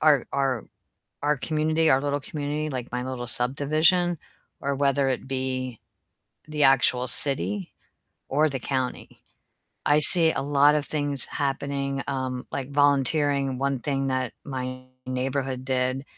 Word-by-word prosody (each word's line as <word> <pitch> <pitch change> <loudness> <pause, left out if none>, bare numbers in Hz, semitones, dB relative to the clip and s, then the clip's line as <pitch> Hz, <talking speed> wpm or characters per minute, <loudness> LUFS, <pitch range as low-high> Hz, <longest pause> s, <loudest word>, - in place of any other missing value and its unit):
our 150 -4 +3
our 135 -5 -1 0.6
our 150 +1 +1
community 155 +3 0
our 130 - +3
little 145 0 -2
community, 150 +2 -4
like, 130 -2 -6
my 125 0 -3
little 130 -1 -6
subdivision, 155 +8 +2 0.4
or 140 0 -2
whether 140 0 0
it 130 - -3
be 130 -2 -4 0.7
the 150 -1 -1
actual 130 -2 +3
city 105 - +6 0.6
or 155 +3 +1
the 135 -2 -5
county. 130 0 -5 0.7
I 150 +1 +3
see 160 +2 +5
a - - -3
lot 145 +1 +3
of 150 - -1
things 145 -3 +1
happening, 140 -1 -3
um, 130 -2 -4
like 135 0 -5
volunteering. 140 -1 +1
One 140 0 -1
thing 135 0 -2
that 130 -2 -2
my 130 -2 -6 0.2
neighborhood 130 0 -3
did 130 0 -2
135 Hz, 135 wpm, -24 LUFS, 130-145 Hz, 0.7 s, city